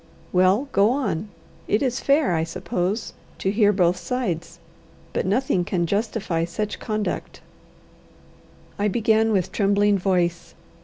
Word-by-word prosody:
"Well 185 Hz, +9 st, +3 dB
go 200 Hz, 0 st, +4 dB
on. 225 Hz, -, -1 dB, 0.4 s
It 210 Hz, -, +1 dB
is 255 Hz, -1 st, 0 dB
fair, 280 Hz, -, +2 dB
I 160 Hz, -1 st, +1 dB
suppose, 180 Hz, +4 st, -3 dB, 0.2 s
to 195 Hz, -, -1 dB
hear 205 Hz, -1 st, +4 dB
both 180 Hz, -3 st, +2 dB
sides. 175 Hz, -5 st, -3 dB, 0.6 s
But -, -, -1 dB
nothing 205 Hz, -3 st, +1 dB
can 175 Hz, -1 st, -1 dB
justify 200 Hz, -3 st, -1 dB
such 205 Hz, +5 st, -3 dB
conduct." 215 Hz, -2 st, -3 dB, 1.4 s
I 205 Hz, -, +2 dB
began 220 Hz, +1 st, +2 dB
with 190 Hz, -5 st, 0 dB
trembling 205 Hz, 0 st, +2 dB
voice. 175 Hz, -2 st, 0 dB
200 Hz, 125 wpm, -23 LUFS, 180-220 Hz, 1.4 s, go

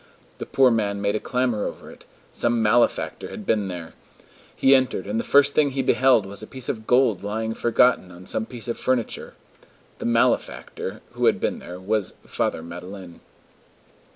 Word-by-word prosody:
The -, -, -5 dB
poor 130 Hz, -2 st, +4 dB
man 100 Hz, -3 st, 0 dB
made 100 Hz, 0 st, 0 dB
a 110 Hz, -, 0 dB
clamor 125 Hz, -4 st, -1 dB
over -, -, -9 dB
it: -, -, -17 dB, 0.3 s
some 120 Hz, -1 st, +1 dB
malefactor 115 Hz, +3 st, +1 dB
had 215 Hz, -3 st, -8 dB
been 105 Hz, -, +1 dB
there! 90 Hz, -3 st, -7 dB, 0.6 s
He 135 Hz, -, +5 dB
entered, 130 Hz, -7 st, +2 dB
and 105 Hz, +3 st, -2 dB
the -, -, -1 dB
first 140 Hz, 0 st, +5 dB
thing 150 Hz, -2 st, +3 dB
he 135 Hz, 0 st, -2 dB
beheld 130 Hz, -6 st, +4 dB
was 100 Hz, +1 st, -6 dB
a 110 Hz, -, -8 dB
piece 130 Hz, -2 st, -6 dB
of 110 Hz, -1 st, -4 dB
gold 125 Hz, -6 st, +3 dB
lying 110 Hz, +2 st, -3 dB
forgotten 120 Hz, -4 st, +2 dB
on 90 Hz, +1 st, -13 dB
some 110 Hz, +4 st, -2 dB
piece 120 Hz, -3 st, -8 dB
of 115 Hz, -, -3 dB
furniture. 130 Hz, -3 st, -2 dB, 0.6 s
The -, -, -5 dB
"malefactor" 115 Hz, 0 st, 0 dB
who -, -, 0 dB
had -, -, +3 dB
been -, -, -1 dB
there 90 Hz, +1 st, -9 dB
was 100 Hz, +1 st, -1 dB
Father 80 Hz, -, -2 dB
Madeleine. 90 Hz, +1 st, -9 dB
110 Hz, 180 wpm, -23 LUFS, 100-125 Hz, 0.6 s, He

